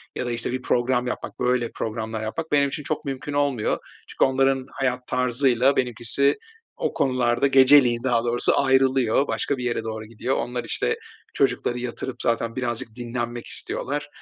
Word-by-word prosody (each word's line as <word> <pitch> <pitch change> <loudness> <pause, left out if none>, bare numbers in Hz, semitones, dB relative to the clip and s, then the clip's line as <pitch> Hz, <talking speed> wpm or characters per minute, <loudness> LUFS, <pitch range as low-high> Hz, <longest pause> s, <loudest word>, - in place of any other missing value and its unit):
ya - - -2
da, 120 - -2
işte, 120 0 -3
bir 130 +1 -3
program 125 0 +1
yapmak, 125 - -5
böyle, 125 -1 +1
programlar 110 0 -3
yapmak 160 +9 -4
benim 140 -1 +3
için 150 - -5
çok 155 - -3
mümkün 135 +1 -4
olmuyor. 140 -6 +1 0.3
Çünkü - - 0
onların 135 0 +2
hayat 125 -2 -2
tarzıyla 125 +1 +2
benimkisi 125 +2 +1 0.4
o - - -1
konularda 125 -1 +2
geceliğin 130 -3 +6
daha 120 -3 +2
doğrusu 120 0 +2
ayrılıyor. 130 -1 +3
Başka 140 - -1
bir 125 - -5
yere 120 -2 -1
doğru 110 -1 -5
gidiyor. 115 +4 -2
Onlar 125 0 -3
işte - - -1 0.4
çocukları 125 -2 0
yatırıp 125 +1 -4
zaten 115 0 0
birazcık 120 -2 -3
dinlenmek 120 0 -4
istiyorlar. 145 +2 -3
125 Hz, 160 wpm, -24 LUFS, 120-135 Hz, 0.4 s, geceliğin